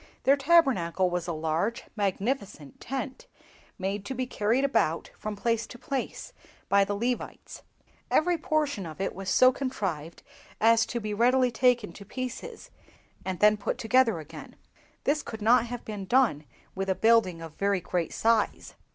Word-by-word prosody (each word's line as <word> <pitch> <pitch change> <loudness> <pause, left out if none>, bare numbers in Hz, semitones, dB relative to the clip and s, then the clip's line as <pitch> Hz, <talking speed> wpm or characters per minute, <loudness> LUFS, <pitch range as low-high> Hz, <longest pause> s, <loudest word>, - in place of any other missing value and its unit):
Their 275 - +5
Tabernacle 265 - +3
was 175 -1 -2
a - - -1
large, 160 +8 -1
magnificent 200 - -3
tent, 265 0 -5 0.5
made 195 +1 -3
to 265 - -4
be 255 +1 -1
carried 240 +3 +1
about 195 - 0
from 215 0 -5
place 230 +2 -1
to 245 - -11
place 270 +1 -4 0.4
by 200 0 +5
the 200 +1 -2
Levites. 240 +4 -4 0.5
Every 350 +3 +3
portion 300 - -1
of 155 +1 -10
it 195 - -2
was 195 0 -5
so 255 +6 +6
contrived 195 - -4 0.4
as 225 +1 +4
to 240 - -3
be 215 -2 -4
readily 250 +3 +3
taken 240 -5 +2
to 200 - -11
pieces, 255 - -7 0.5
and 185 -2 -4
then 210 0 +6
put 205 - -3
together 250 -3 +3
again. 155 -2 -10 0.5
This 300 +1 +1
could 220 - -8
not 240 +2 +4
have 245 0 -6
been 205 -3 -5
done 225 - +2 0.3
with 195 0 -3
a 190 - +2
building 220 -6 +3
of 165 -2 -9
very 200 +1 0
great 175 -1 -2
size." 225 -1 0
220 Hz, 160 wpm, -28 LUFS, 190-255 Hz, 0.5 s, so